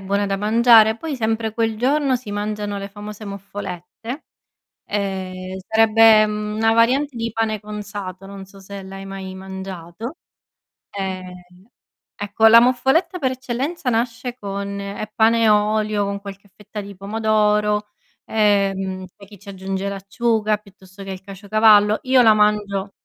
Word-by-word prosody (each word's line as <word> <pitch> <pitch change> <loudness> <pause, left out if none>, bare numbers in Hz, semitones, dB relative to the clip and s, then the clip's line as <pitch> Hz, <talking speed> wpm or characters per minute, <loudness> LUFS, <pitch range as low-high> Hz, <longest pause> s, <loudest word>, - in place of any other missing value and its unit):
buona 200 +1 0
da 195 0 -1
mangiare, 220 +1 +5
poi 305 0 -5
sempre 225 -1 -1
quel 225 -1 -1
giorno 270 +3 +1
si 240 -4 -5
mangiano 205 0 -3
le 200 0 -6
famose 210 +1 -9
Muffolette; 200 - -7 0.6
ehm, 190 -2 -4
sarebbe, 220 -1 +6
mhmm, 210 0 -4
una 225 +1 +3
variante 255 +4 +2
di 230 0 -3
pane 220 -1 -1
cunzato, 205 -3 -7
non 195 0 -9
so 195 +1 -16
se 200 +1 -9
l'hai 195 0 -9
mai 190 -1 -7
mangiato. 190 - -8 0.8
Ehm, 185 -2 -5 0.8
ecco 205 +2 +2
la 230 +1 +9
Moffoletta 265 +9 +2
per 260 -3 0
eccellenza 260 +3 -3
nasce 240 +1 -2
con 200 0 -4
è 200 +2 -6
pane 230 +1 +3
e 220 - +5
olio 210 0 +2
con 200 0 -4
qualche 200 0 -10
fetta 210 +1 -9
di 200 0 -8
pomodoro, 210 +1 +1 0.4
ehm, 195 -3 +1
poi 200 -2 -15
chi 205 - -14
ci 200 - -13
aggiunge 190 0 -4
l'acciuga 215 +2 0
piuttosto 195 -1 -15
che 195 - -6
il 185 - -7
caciocavallo; 210 +2 +3
io 260 0 +4
la 220 -2 +7
mangio 205 -2 +1
210 Hz, 145 wpm, -21 LUFS, 195-225 Hz, 0.8 s, la